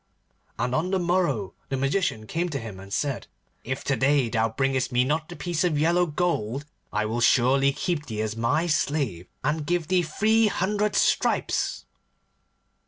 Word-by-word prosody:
And 125 0 -1
on 160 +7 0
the 190 - +1
morrow 170 - 0 0.2
the 135 - -1
Magician 135 - 0
came 170 +9 -2
to 145 - -3
him, 110 -5 -8
and 100 +1 -11
said, 140 +3 -2 0.4
'If 130 +3 -4
to 140 - +1
day 135 0 +2
thou 115 0 +1
bringest 135 +2 0
me 125 0 +3
not 150 +4 -1
the 175 - -7
piece 175 -2 -1
of 170 -4 +1
yellow 170 +4 +3
gold, 145 -6 -1 0.3
I 105 +1 0
will 115 +2 -2
surely 135 +3 +4
keep 150 +1 -2
thee 110 -1 -2
as 110 0 -3
my 115 +9 +1
slave, 140 - -1 0.2
and 150 +3 0
give 170 +1 -1
thee 185 -1 +4
three 215 +7 +2
hundred 205 +2 0
stripes. - - +1
145 Hz, 170 wpm, -25 LUFS, 120-175 Hz, 0.4 s, surely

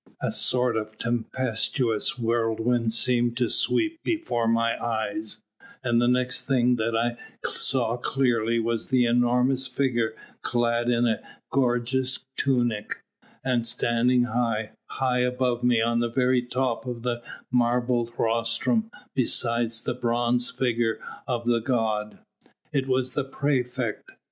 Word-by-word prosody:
A - - -1
sort 125 -2 +2
of 110 0 -5
tempestuous 120 +2 0
whirlwind 115 0 +1
seemed 120 0 +2
to 120 -3 +1
sweep 330 -1 +1
before 310 - -1
my 115 0 +1
eyes, 110 -1 -3 0.4
and 120 -1 +2
the 120 - +3
next 125 0 0
thing 125 -2 +3
that 115 0 0
I 120 +1 0 0.4
saw 120 -3 +1
clearly 120 -3 +1
was 115 +2 -1
an 130 - +4
enormous 125 +2 +2
figure 125 -4 0 0.3
clad 120 0 +1
in 120 0 +3
a 110 -2 +1 0.3
gorgeous 130 0 0
tunic, 120 -6 0 0.4
and 125 -3 +1
standing 120 +1 +2
high, 115 -2 -1 0.2
high 130 -1 0
above 125 -1 0
me 120 -2 +3
on 115 0 +1
the 120 0 0
very 125 +1 +2
top 125 0 -2
of 120 -2 -5
the 120 -1 -2 0.3
marble 120 -1 +1
rostrum 115 - +1 0.2
beside 120 -2 +2 0.2
the - - 0
bronze 120 0 0
figure 120 -3 0 0.3
of 120 -3 -2
the 120 -1 +3
god. 110 -4 -1 0.6
It 135 -1 0
was 130 -1 0
the 145 - 0
praefect. 130 -4 -2
120 Hz, 130 wpm, -26 LUFS, 115-125 Hz, 0.6 s, an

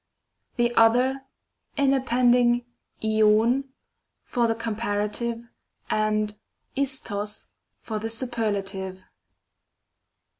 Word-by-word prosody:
The 240 0 +1
other, 250 +4 +4 0.5
in 275 -1 +4
appending 245 -2 +3 0.4
ioiv 220 +4 +3 0.6
for 240 -2 +1
the 225 - +1
com 230 -1 -3
parative, 230 +2 -2 0.4
and 215 0 +1 0.4
l6to(; 225 -7 -3 0.4
for 215 -2 -3
the 225 +1 -3
superlative. 200 -6 -3
230 Hz, 80 wpm, -25 LUFS, 210-245 Hz, 0.6 s, other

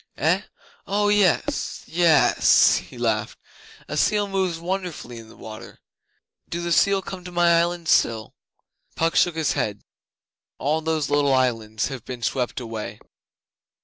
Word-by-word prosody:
'Eh? - - +2 0.5
Oh 205 +1 +1
yes 205 -4 +1
yess!' 165 -2 +4
he - - -9
laughed. - - -1 0.5
'A - - -5
seal 205 -1 +2
moves 190 -3 -1
wonderfully 170 -8 -5
in 110 -1 -13
the - - -16
waters. 110 -1 -10 0.7
Do 170 - -3
the 170 - -3
seal 195 +3 +3
come 185 -1 -8
to 180 - -9
my 170 -1 +4
island 170 0 -1
still?' 110 -7 +2 0.6
Puck 165 0 0
shook 175 -2 +3
his 155 -4 0
head. 110 -7 -3 0.7
'All 155 +3 0
those 155 -3 -1
little 145 -2 +3
islands 115 -4 0
have 130 -5 -7
been 125 -2 -8
swept 125 +3 -1
away. 115 -3 -6
160 Hz, 145 wpm, -23 LUFS, 125-175 Hz, 0.7 s, yess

